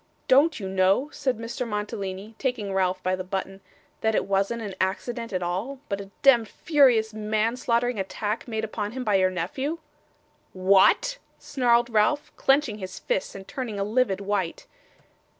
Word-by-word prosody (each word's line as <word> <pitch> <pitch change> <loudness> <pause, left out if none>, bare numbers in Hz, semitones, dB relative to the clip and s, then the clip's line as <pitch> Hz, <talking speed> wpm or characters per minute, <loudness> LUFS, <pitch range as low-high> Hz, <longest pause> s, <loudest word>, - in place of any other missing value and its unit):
'Don't 290 +4 +4
you 195 - -4
know,' 190 +9 +2
said 260 -6 -1
Mr. 230 +2 -6
Mantalini, 210 -1 -4
taking 235 -7 -2
Ralph 185 -1 0
by 185 0 +1
the 185 - -5
button, 195 +1 -4 0.4
'that 220 0 +1
it - - +1
wasn't 200 +4 0
an 200 -2 -5
accident 230 +5 -2
at 185 -2 -2
all, 190 +11 -3
but 200 -1 -2
a 195 - -10
demd, 240 -5 +6
furious, 245 -6 +3
manslaughtering 230 +2 0
attack 205 +4 -3
made 220 -2 -3
upon 210 -1 -3
him 260 0 -4
by 215 -4 0
your 190 -1 +4
nephew?' 260 - -3 0.8
'What!' 195 - +4 0.2
snarled 240 -3 +1
Ralph, 220 +7 +2
clenching 270 -6 +2
his 185 -1 -7
fists 190 - -2
and 195 0 -9
turning 235 -6 -4
a - - +1
livid 210 -2 +1
white. 195 -4 -2
215 Hz, 160 wpm, -25 LUFS, 195-245 Hz, 0.8 s, demd